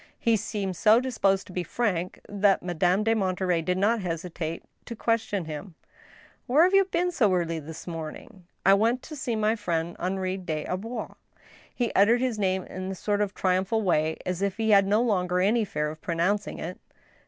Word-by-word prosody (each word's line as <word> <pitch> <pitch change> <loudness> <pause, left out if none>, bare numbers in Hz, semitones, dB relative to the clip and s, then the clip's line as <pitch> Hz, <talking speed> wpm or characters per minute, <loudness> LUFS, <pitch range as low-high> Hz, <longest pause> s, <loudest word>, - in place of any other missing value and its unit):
He 230 -1 +2
seemed 205 -3 -3
so 215 +5 +5
disposed 200 -7 +1
to 185 - -12
be 180 - -1
frank, 185 -1 -2
that 200 -2 +2
Madame 180 +3 +1
de 225 +1 +3
Monterey 185 -4 0
did 180 +2 -1
not 215 +3 +2
hesitate 165 -2 -4 0.2
to 235 - -6
question 220 -5 -1
him: 155 +3 -7 0.4
" - - -26
Where 285 +6 +5
have 370 +2 +3
you 390 0 +6
been 360 -1 0
so 225 - +2
early 170 -3 0
this 160 +1 -9
morning? 165 +2 -8
" - - -48
" - - -45
I 195 - +7
went 230 +5 +2
to 310 - -8
see 265 -5 -2
my 215 +1 +2
friend 170 -5 -2
Henri 185 +1 -2
des 160 -5 -4
Arbois." 220 +7 -4 0.6
He 240 -3 -1
uttered 230 +5 +4
this 250 -4 -1
name 190 -2 +1
in 185 +1 -6
a - - -5
sort 205 +3 -1
of 205 -1 -1
triumphal 190 +4 +1
way, 160 -4 +1
as 180 0 -2
if 200 0 -1
he 220 -1 +1
had 195 -1 +6
no 210 +4 +3
longer 180 -6 +1
any 215 +5 +3
fear 150 -6 -2
of 155 - -12
pronouncing 180 +4 -1
it. 180 +2 -6
195 Hz, 200 wpm, -26 LUFS, 180-220 Hz, 0.6 s, I